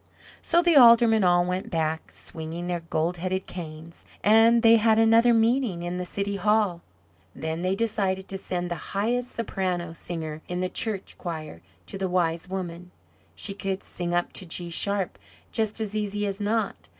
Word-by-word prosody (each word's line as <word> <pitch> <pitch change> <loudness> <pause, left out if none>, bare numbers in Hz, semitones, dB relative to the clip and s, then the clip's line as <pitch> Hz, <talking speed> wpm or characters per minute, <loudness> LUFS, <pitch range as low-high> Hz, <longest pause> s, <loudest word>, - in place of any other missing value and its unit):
So 340 +1 +3
the 345 -2 +4
Aldermen 235 -4 +7
all 175 -1 +4
went 180 +1 -3
back, 160 -1 -2
swinging 165 +1 -6
their 175 -1 -2
gold 165 +1 -2
headed 185 +2 -2
canes, 165 -1 -9 0.2
and 225 +2 +5
they 230 0 +7
had 220 0 +3
another 225 +2 +5
meeting 225 -5 +2
in 175 +1 -3
the 180 0 -4
City 200 +1 -2
Hall. 210 -4 +1 0.5
Then 160 +1 -3
they 185 +1 0
decided 195 -3 -1
to 195 - -3
send 180 -2 -3
the 175 +3 -5
highest 245 +4 0
Soprano 180 -6 -2
Singer 160 -2 -6
in 180 0 -3
the 185 0 -1
church 205 -2 -4
choir 155 - -6 0.2
to 195 - -8
the 190 -1 -1
Wise 170 -1 0
Woman; 180 -2 -5 0.5
she 200 - -3
could 195 0 -4
sing 175 -1 -4
up 175 0 0
to 190 - -2
G 170 +1 -3
sharp 195 - -2 0.3
just 220 0 -1
as 215 -1 -3
easy 205 -1 -1
as 200 0 -3
not. 220 +2 -2
190 Hz, 175 wpm, -26 LUFS, 175-220 Hz, 0.5 s, Aldermen